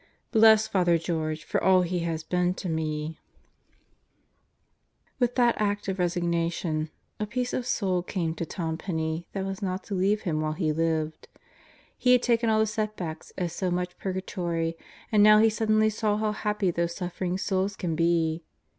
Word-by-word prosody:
Bless 220 -1 +6
Father 175 -3 +3
George 155 -2 -2
for - - -1
all 185 -1 +5
he 180 0 -1
has 165 -1 -2
been 180 +1 0
to 190 - -5
me," 155 -1 -3 2.0
With 245 -1 +1
that 240 -2 +4
Act 205 -1 0
of 190 -1 -2
Resignation 170 -2 -1 0.3
a 210 - -2
peace 250 +3 -2
of 250 - -2
soul 185 -6 0
came 175 -2 -2
to 170 - -4
Tom 160 -1 -3
Penney 160 -2 -3
that 195 -1 -2
was 195 +1 -5
not 185 -1 -2
to 210 - -6
leave 200 +3 +1
him 155 -6 -1
while 155 0 -1
he 155 -2 0
lived. 160 -1 -1 0.7
He 250 -1 +5
had 250 - +4
taken 235 -1 +2
all 220 - +3
the 220 - +4
setbacks 215 -6 -4
as 175 -3 -2
so 185 +1 -1
much 180 0 -2
Purgatory, 175 -3 -2 0.4
and 210 -2 +5
now 215 0 +8
he 220 +1 +5
suddenly 215 0 +2
saw 210 -1 0
how 215 0 0
happy 210 -3 0
those 170 0 -1
suffering 180 0 -3
souls 195 +1 -1
can 170 -4 -2
be. 165 0 +1
180 Hz, 170 wpm, -27 LUFS, 165-210 Hz, 2.0 s, now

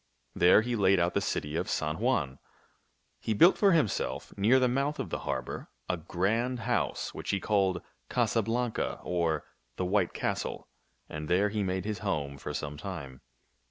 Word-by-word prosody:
There 90 +4 +6
he 120 0 -1
laid 100 -3 +4
out 85 0 +1
the - - +1
city 75 +1 -2
of - - -1
San 75 +1 -1
Juan. 65 -2 0 0.8
He 110 - -1
built 175 - +7
for 200 -2 +4
himself, 155 - 0
near 110 +7 +4
the 130 - +3
mouth 140 +4 0
of - - -4
the - - -2
harbor, - - -3 0.2
a 90 - +1
grand 110 +9 -1
house - - -1
which - - -7
he 100 - +1
called 95 -4 +1 0.3
Casa 115 - +2
Blanca, 115 +2 -1
or 85 -3 0 0.3
the 90 - -2
White 95 -1 +1
Castle; - - -3 0.4
and 75 0 -6
there 95 +5 +3
he 105 0 -2
made 95 -1 -1
his 105 -3 -3
home 75 -9 -2
for - - -5
some 75 -1 -4
time. 75 -9 -7
95 Hz, 175 wpm, -30 LUFS, 85-110 Hz, 0.8 s, built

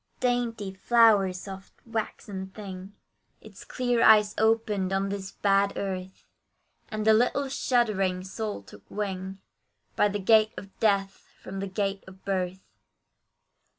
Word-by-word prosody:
Dainty, 235 -5 -1
flower 210 -2 +4
soft, 190 +1 -9
waxen 210 -4 -4
thing, 190 -1 -9 0.5
Its - - -13
clear 245 -2 0
eyes 210 -2 +6
opened 220 -4 +1
on 195 +1 0
this 195 -1 -5
bad 200 0 +2
earth, 190 -1 -5 0.6
And 215 0 -3
the 220 - +6
little 250 +5 +2
shuddering 210 -9 +1
soul 205 - -5
took 100 +1 -14
wing, 190 -2 -4 0.6
By 210 - +4
the 205 0 -2
gate 215 +2 +4
of 195 -1 -10
death, 195 -3 0
from 195 +1 -6
the 195 - -3
gate 195 0 -2
of 190 0 -15
birth. 190 -1 -2
200 Hz, 130 wpm, -27 LUFS, 190-220 Hz, 0.6 s, eyes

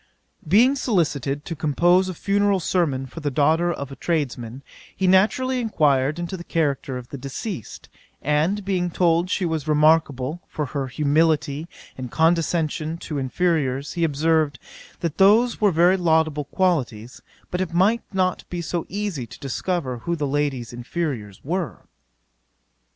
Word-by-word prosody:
" - - -26
'Being 235 - +5
solicited 145 - 0
to 165 - -4
compose 175 +5 +3
a 185 - -5
funeral 200 +2 +1
sermon 155 -7 0
for 135 +5 -9
the 150 -2 -1
daughter 160 +5 +2
of 140 -4 -5
a - - -7
tradesman, 135 -6 -3 0.3
he 190 - -1
naturally 225 +8 +3
enquired 150 - +2
into 175 +2 -4
the 175 - -8
character 140 -6 -1
of 125 -1 -9
the 140 - -7
deceased; 140 - -6 0.3
and 160 +8 0
being 180 -2 0
told 170 0 +2
she 185 - 0
was 160 -3 -2
remarkable 150 -1 +2
for 150 - -3
her 140 -1 -3
humility 150 +1 +1 0.3
and 125 -1 -5
condescension 160 0 +1
to 150 -3 -5
inferiours, 140 -1 0
he 170 - -1
observed, 155 -2 +1 0.4
that 165 0 -3
those 220 +6 +5
were 205 -2 +5
very 175 +3 +4
laudable 160 -4 +1
qualities, 130 - -1 0.3
but 180 - -1
it 185 -3 -2
might 200 +7 +3
not 185 -2 0
be 175 - -4
so 170 0 -3
easy 195 - -3
to - - -12
discover 135 -1 -3
who 170 +7 -2
the 150 -3 -2
lady's 140 -4 -1
inferiours 120 - -4
were. 170 +2 -3
160 Hz, 150 wpm, -23 LUFS, 140-180 Hz, 0.4 s, Being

